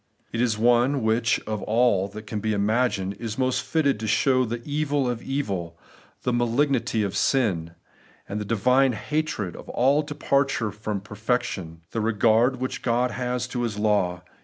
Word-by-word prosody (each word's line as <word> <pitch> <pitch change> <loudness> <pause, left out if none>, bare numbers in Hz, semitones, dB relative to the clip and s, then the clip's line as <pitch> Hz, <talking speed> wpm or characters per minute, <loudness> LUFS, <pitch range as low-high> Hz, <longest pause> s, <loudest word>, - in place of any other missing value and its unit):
It 115 - -1
is 115 -4 +1
one 120 +3 +3
which, 110 +1 +2
of 110 -1 -4
all 110 -4 +2
that 105 +2 -9
can 105 0 -4
be 110 +1 -1
imagined, 105 -1 +1
is 115 -1 -5
most 130 -1 +1
fitted 140 -7 +1
to 110 - -3
show 130 +4 +3
the 120 +1 -5
evil 145 -2 0
of 120 -1 -2
evil, 95 -12 -3 0.5
the 125 - 0
malignity 120 -1 +1
of 100 - -3
sin, 90 -11 +1 0.5
the 105 +2 -3
divine 125 +5 +3
hatred 115 - -2
of - - -11
all 135 +4 +3
departure 140 -6 0
from 105 -1 -4
perfection, 105 -5 -3
the 115 - -1
regard 115 +3 +3
which 130 +1 -4
Ood 125 +1 +2
has 125 0 -2
to 125 -1 -3
His 115 -4 -2
law. 100 -4 +1
115 Hz, 160 wpm, -25 LUFS, 105-130 Hz, 0.5 s, one